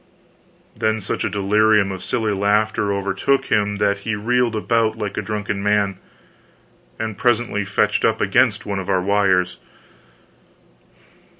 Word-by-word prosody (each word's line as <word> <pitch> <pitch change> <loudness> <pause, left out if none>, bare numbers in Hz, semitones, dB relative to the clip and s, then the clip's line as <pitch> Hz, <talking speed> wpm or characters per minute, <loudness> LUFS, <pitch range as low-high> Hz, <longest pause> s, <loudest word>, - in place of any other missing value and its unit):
Then 110 0 0
such 100 - -3
a - - 0
delirium 105 +1 +2
of 95 -1 -7
silly 110 -3 -1
laughter 105 +1 +1
overtook 100 +7 -1
him 105 -1 +1
that 100 0 0
he 110 +2 -3
reeled 120 +2 0
about 110 0 0
like 105 -2 -4
a - - -2
drunken 105 -2 -3
man, 100 -1 +1 1.0
and 110 -2 -4
presently 120 -3 +1
fetched 100 0 0
up - - +2
against 105 +1 +2
one 100 -2 -3
of 95 - -6
our 95 - +2
wires. 95 -2 +1
105 Hz, 135 wpm, -20 LUFS, 100-110 Hz, 1.0 s, delirium